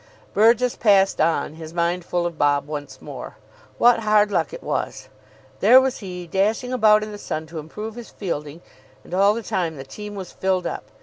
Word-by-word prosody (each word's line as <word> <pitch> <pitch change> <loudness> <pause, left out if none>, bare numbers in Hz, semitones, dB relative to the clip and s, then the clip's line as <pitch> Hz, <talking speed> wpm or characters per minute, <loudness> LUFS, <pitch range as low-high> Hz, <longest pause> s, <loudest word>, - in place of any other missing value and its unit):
Burgess 230 +3 +4
passed 195 -5 +3
on, 155 -2 +1
his 160 +1 -10
mind 170 +1 0
full 175 0 -1
of 170 -1 -3
Bob 145 -1 +2
once 145 -1 -7
more. - - -8 0.4
What 240 -1 +5
hard 210 -1 +3
luck - - 0
it - - -9
was! - - -3 0.5
There 255 - +8
was 265 -1 -1
he, 180 -4 -7
dashing 215 +8 0
about 215 -3 +5
in 215 - -6
the 205 - -8
sun 155 -4 -4
to 160 0 -7
improve 210 +9 -7
his 240 0 -10
fielding, 160 -4 -5 0.4
and - - -12
all 200 +3 +4
the 230 - -4
time 170 -5 -2
the 135 - -7
team 210 +9 -9
was 190 -3 -7
filled 190 -1 -1
up. - - -4
190 Hz, 195 wpm, -22 LUFS, 165-215 Hz, 0.5 s, There